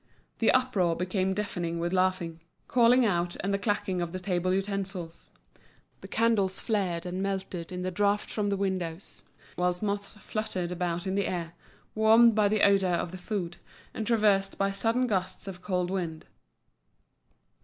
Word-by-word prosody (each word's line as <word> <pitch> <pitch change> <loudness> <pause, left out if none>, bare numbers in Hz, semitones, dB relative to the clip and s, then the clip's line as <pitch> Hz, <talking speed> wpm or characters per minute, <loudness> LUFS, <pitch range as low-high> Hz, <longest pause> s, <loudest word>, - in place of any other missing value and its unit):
The 225 - +3
uproar 205 -10 +2
became 185 +2 -1
deafening 175 -5 -2
with 170 +2 -2
laughing, 185 -3 0 0.3
calling 245 +1 +5
out, 175 -4 0
and 200 +1 -1
the 200 - +1
clacking 205 -3 -1
of 170 0 -3
the 185 - -3
table 185 -1 0
utensils; 195 -3 -3 0.7
the - - -10
candles 215 -5 +1
flared 185 -7 -1
and 180 +1 -3
melted 190 -3 -3
in 180 0 -4
the 185 - -2
draught 205 +2 +1
from 205 -2 -1
the 200 - 0
windows, 185 -3 -3 0.4
whilst 180 +2 0
moths 200 -1 -2
fluttered 200 -4 -3
about 175 0 -2
in 190 - -1
the 200 0 +1
air, 170 -2 -3 0.4
warmed 225 +2 +6
by 210 -1 +3
the 210 0 +1
odour 195 -2 +4
of 170 - -2
the 185 - -8
food, 180 -3 -3 0.4
and 220 - -4
traversed 205 -4 +2
by 195 0 +1
sudden 230 +5 +1
gusts 190 -4 -2
of 180 -2 -7
cold 180 -2 -1
wind. 170 -4 -3
190 Hz, 165 wpm, -28 LUFS, 180-205 Hz, 0.7 s, warmed